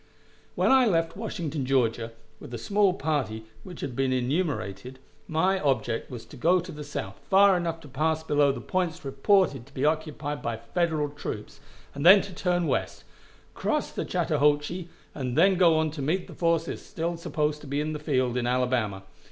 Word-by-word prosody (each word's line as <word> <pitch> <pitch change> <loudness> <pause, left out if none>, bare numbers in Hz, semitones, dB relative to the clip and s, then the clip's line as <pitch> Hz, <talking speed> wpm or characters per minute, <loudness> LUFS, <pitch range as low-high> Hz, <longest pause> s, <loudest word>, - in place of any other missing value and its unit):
When - - +3
I 260 -2 +6
left 165 -4 +1
Washington, 170 -9 -4
Georgia, 120 -3 +1 0.3
with - - -10
the 120 - -5
small 200 - +2
party 145 - -2 0.2
which 180 -3 -9
has 140 - -3
been 130 +2 0
enumerated, 130 - -2 0.3
my 185 +4 +1
object 130 -6 -1
was 120 -3 -8
to - - -13
go 170 +7 +3
to 180 +1 -7
the 150 -2 -7
south 100 -9 -6
far 195 0 +6
enough 165 -2 -2
to 150 - -12
pass 155 +4 0
below 145 -2 +3
the - - -6
points 180 -3 -2
reported 135 - +2
to 140 - -20
be 135 - 0
occupied 150 -1 -1
by 115 -1 -3
Federal 155 +5 -1
troops, 145 - -7 0.3
and 140 - -5
then 190 +4 +8
turn 180 -2 -1
to - - 0
the - - -1
west, - - -2 0.5
cross - - -1
the - - -3
Chattahoochee, 150 +4 0 0.2
and 130 -2 -3
then 190 +4 +6
go 175 -3 +4
on 155 -1 +1
to 150 -1 -6
meet 170 +7 0
the - - -12
forces 165 -1 0
still 170 +1 -3
supposed 150 -2 -2
to 150 - -11
be 140 +1 -1
in 155 +1 -2
the 150 - -4
field 130 -5 0
in 120 -1 0
Alabama. 125 -6 0
150 Hz, 190 wpm, -27 LUFS, 130-170 Hz, 0.5 s, then